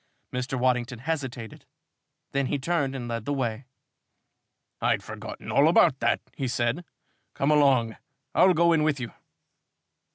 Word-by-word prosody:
Mr. 125 +2 -2
Waddington 125 -1 0
hesitated. 130 -4 -5 0.6
Then 135 -1 0
he 145 - 0
turned 140 -2 -1
and 120 -3 -5
led 115 -2 -4
the 145 - -1
way. 125 -2 -2 1.2
"I'd - - +1
forgotten - - -8
all - - +5
about - - +4
that," - - +1
he 135 - -2
said. 120 +6 -1 0.5
"Come 140 +2 +1
along, 135 -7 +3 0.4
I'll 185 0 +5
go 170 +1 +4
in 160 - +3
with 150 -2 +1
you." 120 -4 -6
130 Hz, 140 wpm, -26 LUFS, 120-145 Hz, 1.2 s, all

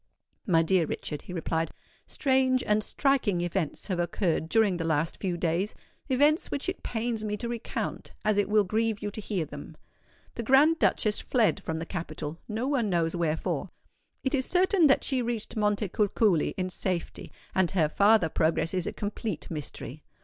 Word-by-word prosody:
"My 165 -4 +4
dear 170 -1 +2
Richard," 150 -1 -4
he - - -10
replied, 165 -1 -1 0.4
"strange 260 -2 +2
and 210 0 +1
striking 245 -11 +1
events 175 -2 -2
have 185 -4 -2
occurred 170 -2 0
during 215 -4 +3
the 165 - -2
last 160 0 0
few 180 -3 -2
days,—events 250 - 0
which 285 - -2
it 370 - -3
pains 225 -1 -2
me 210 -1 -2
to 235 - -4
recount, 235 -1 -4
as 210 -1 +3
it 205 - +1
will 210 0 +4
grieve 220 +2 0
you 205 - -2
to 215 - -6
hear 195 -6 -2
them. 145 +2 -10 0.6
The - - -4
Grand 280 +7 +5
Duchess 215 -1 +2
fled 225 -5 +2
from 160 -4 -3
the 165 - -4
capital—no 170 - -5
one 255 -7 +1
knows 170 -2 +1
wherefore. 160 -2 -1 0.5
It 265 - -1
is 260 -3 +1
certain 365 -2 +4
that 275 - +3
she 265 -2 0
reached 235 -2 -3
Montecuculi 210 -3 +1
in 185 -1 -2
safety; 180 -2 -3 0.2
and 185 -2 +2
her 170 -5 +2
farther 200 +2 +4
progress 165 +2 +1
is 180 -2 -1
a - - -3
complete 205 -4 -4
mystery. 150 -5 -6
205 Hz, 170 wpm, -28 LUFS, 170-235 Hz, 0.6 s, Grand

